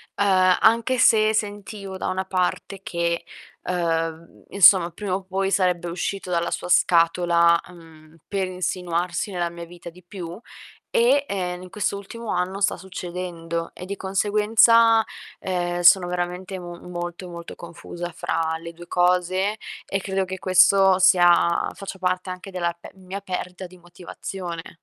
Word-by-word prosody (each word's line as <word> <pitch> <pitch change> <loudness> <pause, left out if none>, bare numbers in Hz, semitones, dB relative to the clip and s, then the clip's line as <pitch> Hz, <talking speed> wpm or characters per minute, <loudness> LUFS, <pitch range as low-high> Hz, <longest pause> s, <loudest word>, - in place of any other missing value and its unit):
uhm, 185 -2 +3
anche 230 +3 +3
se 220 -2 +4
sentivo 205 -2 -4
da - - -4
una 185 +1 -2
parte 190 +1 -2
che, 170 -2 -2 0.4
uhm, 165 -2 -3
insomma, 185 -2 +6
prima 190 +2 -5
o 190 +1 -2
poi 195 +1 -2
sarebbe 180 -2 +1
uscito 185 +2 -4
dalla 170 0 0
sua - - -4
scatola, 170 -1 +4
mhmm, 160 -2 -16
per 195 -2 -1
insinuarsi 180 0 -2
nella 175 -2 -2
mia 170 0 -8
vita 170 0 -11
di 180 +1 -18
più 175 0 -8 0.5
e, 265 +4 +4
en 180 -2 -3
in 185 - -11
questo 200 +1 -2
ultimo 220 +3 -7
anno 185 +2 -2
sta 200 - +2
succedendo 175 -2 -6
e 180 - -9
di 200 +2 -5
conseguenza, 215 +4 +4 0.4
ehm, 175 -1 -2
sono 175 +1 +6
veramente 180 +1 -4
mu 175 -1 -9
molto, 175 +1 -6
molto 170 -1 -9
confusa 170 0 -8
fra 160 -1 -2
le 170 0 -9
2 175 +1 -13
cose, 180 +3 +1 0.3
e 195 0 -2
credo 190 0 -1
che 190 0 -6
questo 190 +1 +5
sia 175 -2 +4
faccia 195 -1 -8
parte 185 0 -2
anche 185 +1 -7
della 170 -2 -2
pe - - -12
mia 190 +1 -8
perdita 180 -1 -5
di 185 +1 -17
motivazione. 175 -1 -8
180 Hz, 150 wpm, -23 LUFS, 175-195 Hz, 0.5 s, insomma